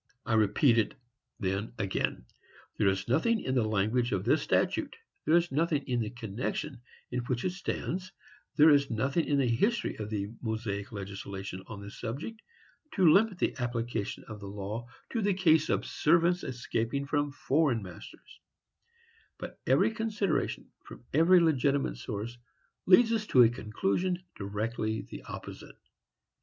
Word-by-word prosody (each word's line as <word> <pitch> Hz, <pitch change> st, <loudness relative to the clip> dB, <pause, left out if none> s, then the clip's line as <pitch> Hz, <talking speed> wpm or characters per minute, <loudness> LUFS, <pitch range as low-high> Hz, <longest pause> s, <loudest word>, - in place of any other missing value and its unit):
I 115 Hz, -, -1 dB
repeat 110 Hz, +3 st, +4 dB
it, 110 Hz, -, 0 dB, 0.4 s
then, 100 Hz, +2 st, -2 dB
again: 95 Hz, -, -2 dB, 0.5 s
there 105 Hz, -, +3 dB
is 95 Hz, 0 st, 0 dB
nothing 190 Hz, -, +2 dB
in 130 Hz, -, -2 dB
the 125 Hz, -3 st, +3 dB
language 110 Hz, +4 st, +1 dB
of 95 Hz, -2 st, 0 dB
this 135 Hz, +8 st, +3 dB
statute, -, -, 0 dB, 0.3 s
there 160 Hz, -, +4 dB
is 175 Hz, 0 st, +2 dB
nothing 150 Hz, 0 st, +1 dB
in 125 Hz, -3 st, -1 dB
the 110 Hz, -2 st, -1 dB
connection 120 Hz, +3 st, -4 dB, 0.3 s
in 125 Hz, -, -1 dB
which 125 Hz, -1 st, -2 dB
it 185 Hz, -, +1 dB
stands, 185 Hz, 0 st, -4 dB, 0.4 s
there 155 Hz, +1 st, +7 dB
is 140 Hz, -1 st, +4 dB
nothing 130 Hz, +8 st, 0 dB
in 145 Hz, -, +1 dB
the 135 Hz, -2 st, +2 dB
history 200 Hz, -, +1 dB
of 105 Hz, -1 st, -5 dB
the 100 Hz, -2 st, -2 dB
Mosaic 110 Hz, -3 st, -3 dB
legislation 100 Hz, -2 st, -6 dB
on 100 Hz, -3 st, -8 dB
this 100 Hz, +1 st, -10 dB
subject, 145 Hz, -, -5 dB, 0.5 s
to 175 Hz, -6 st, +6 dB
limit 205 Hz, -1 st, +3 dB
the -, -, 0 dB
application 120 Hz, -3 st, -3 dB
of 110 Hz, -2 st, -9 dB
the 100 Hz, -, -8 dB
law 105 Hz, +4 st, -5 dB, 0.2 s
to 230 Hz, -, -1 dB
the 200 Hz, -2 st, +2 dB
case 160 Hz, -5 st, +4 dB
of -, -, +1 dB
servants 170 Hz, +3 st, +2 dB
escaping 125 Hz, +2 st, -2 dB
from 145 Hz, 0 st, 0 dB
foreign 140 Hz, -5 st, +1 dB
masters; 90 Hz, -2 st, -12 dB, 1.0 s
but -, -, -8 dB
every -, -, +4 dB
consideration, 215 Hz, -7 st, -1 dB
from -, -, -12 dB
every 165 Hz, +5 st, +6 dB
legitimate 140 Hz, -4 st, +2 dB
source, 115 Hz, +2 st, -5 dB, 0.5 s
leads 225 Hz, +5 st, +6 dB
us 215 Hz, -2 st, -1 dB
to 125 Hz, -, +7 dB
a 115 Hz, -, +6 dB
conclusion 120 Hz, -, -1 dB, 0.2 s
directly 110 Hz, +2 st, -2 dB
the -, -, -9 dB
opposite. -, -, -9 dB
125 Hz, 155 wpm, -30 LUFS, 110-160 Hz, 1.0 s, there